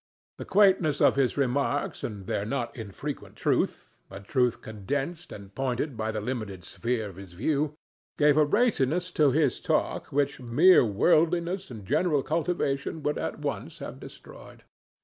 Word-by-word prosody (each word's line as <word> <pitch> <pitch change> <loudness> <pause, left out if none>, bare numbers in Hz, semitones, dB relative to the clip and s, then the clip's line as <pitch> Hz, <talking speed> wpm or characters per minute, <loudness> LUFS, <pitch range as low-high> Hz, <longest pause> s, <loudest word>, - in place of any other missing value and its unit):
The - - -5
quaintness 185 -7 +3
of - - +5
his 135 -1 +1
remarks 140 +1 0
and 100 -4 -5
their 100 - -1
not 120 +1 -3
infrequent 115 +6 -7
truth—a 100 - -2
truth 125 +3 +1
condensed 140 - -4
and 100 -1 -10
pointed 135 +2 -2
by 110 0 -2
the 110 - -3
limited 105 -5 -5
sphere 115 +2 -2
of 95 -3 -11
his 95 -3 -11
view—gave 150 - -1
a 155 - +5
raciness 180 - +1
to 150 -4 +4
his 145 0 +1
talk - - 0
which 140 0 0
mere 140 +10 +5
worldliness 170 - +2
and 110 -5 -9
general 150 - +1
cultivation 155 -2 -1
would 150 - -1
at - - -4
once - - -4
have - - -8
destroyed. - - -13
140 Hz, 150 wpm, -27 LUFS, 110-155 Hz, -, of